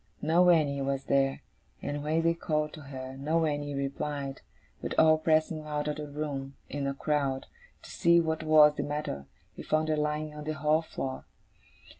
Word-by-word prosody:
No 170 +4 +4
Annie 145 -5 +3
was 135 0 -1
there; 135 0 +1 0.4
and 145 0 -4
when 160 +2 +1
they 165 0 +3
called 155 -2 -1
to 155 - -9
her, 130 -2 -7
no 160 +4 +1
Annie 145 -1 -2
replied. 140 0 -3 0.4
But - - -4
all 155 0 +6
pressing 155 0 +2
out 150 -1 -3
of 150 0 -2
the 150 -1 -5
room, 140 -2 -4 0.2
in 140 -1 -2
a 140 - -2
crowd, 140 -2 -1 0.4
to - - -11
see 170 0 +4
what 160 -1 0
was 155 -1 +6
the 145 - -3
matter, 145 - -4 0.3
we - - -8
found 155 0 0
her 155 - +2
lying 150 0 -1
on 150 0 -8
the 155 - -1
hall 155 +1 +2
floor. 135 -4 -5
150 Hz, 185 wpm, -29 LUFS, 140-155 Hz, 0.4 s, all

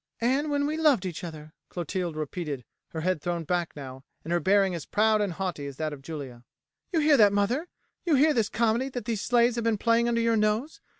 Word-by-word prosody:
"And 265 +6 +1
when 285 0 +1
we 305 +2 -1
loved 295 - +3
each 175 -2 -5
other," 155 -2 -8 0.2
Clotilde 175 -1 -3
repeated, 150 -4 -4 0.2
her 160 - -6
head 185 -2 0
thrown 175 -1 -2
back 175 +1 -2
now, 135 -2 -9 0.2
and 170 - -3
her 175 - +3
bearing 195 +1 +3
as 170 -3 -4
proud 215 0 +3
and 200 -4 -1
haughty 175 -5 -4
as 140 - -7
that 155 -1 -2
of 140 - -9
Julia. 135 -5 -8 0.5
"You 330 -3 +2
hear 295 -1 +5
that, 205 -2 +6
mother? 235 - 0 0.4
you 330 -4 +3
hear 300 +3 +4
this 225 -4 +1
comedy 235 +3 +1
that 245 -4 -6
these 220 -3 -2
slaves 240 0 +3
have 235 - -1
been 225 -2 +1
playing 230 +2 +2
under 235 -1 +1
your 230 0 +2
nose? 215 +8 0
205 Hz, 225 wpm, -27 LUFS, 165-235 Hz, 0.5 s, that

